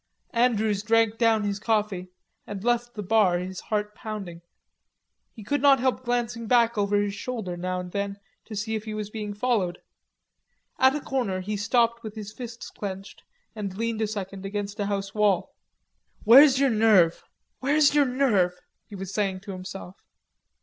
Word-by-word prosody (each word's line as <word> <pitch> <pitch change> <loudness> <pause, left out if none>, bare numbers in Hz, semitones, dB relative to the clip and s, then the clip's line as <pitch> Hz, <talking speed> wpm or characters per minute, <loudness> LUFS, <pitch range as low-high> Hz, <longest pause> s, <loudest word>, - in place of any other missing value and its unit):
Andrews 220 -4 +2
drank 225 0 +2
down 225 -2 +3
his 200 -1 -2
coffee 210 -4 -1 0.4
and 200 -2 -6
left 240 0 0
the 210 - -4
bar, 200 -3 +3
his 185 +1 -5
heart 210 -1 -2
pounding. 200 -7 -7 0.9
He 220 - -12
could 285 +7 -1
not 275 -2 +6
help 255 0 0
glancing 240 -1 -2
back 235 0 +4
over 205 0 +1
his 205 -1 -1
shoulder 215 -5 -4
now 180 +1 -3
and 180 0 -7
then 200 0 -3 0.3
to 220 - -8
see 215 +2 -3
if 215 0 -3
he 215 -1 -5
was 210 -1 -5
being 210 -2 -5
followed. 205 -6 0 1.0
At 265 +1 +5
a 300 - -3
corner 230 -11 -2
he 210 +3 -3
stopped 235 +3 +1
with 220 -2 -8
his 215 -1 -7
fists 240 0 -8
clenched 195 -1 -7 0.3
and 200 -3 -5
leaned 230 0 -2
a 220 - +1
second 195 -2 -6
against 205 +1 -4
a 200 - 0
house 195 -1 -3
wall. 210 -4 +1 0.7
"Where's 265 +4 +8
your 275 -2 +3
nerve. 210 -7 +4 0.4
Where's 285 +2 +3
your 295 -1 +4
nerve?" 245 -9 +2 0.3
He 205 - -10
was 195 0 -6
saying 195 -3 -1
to 200 - -8
himself. 185 0 -8
210 Hz, 170 wpm, -26 LUFS, 195-235 Hz, 1.0 s, Where's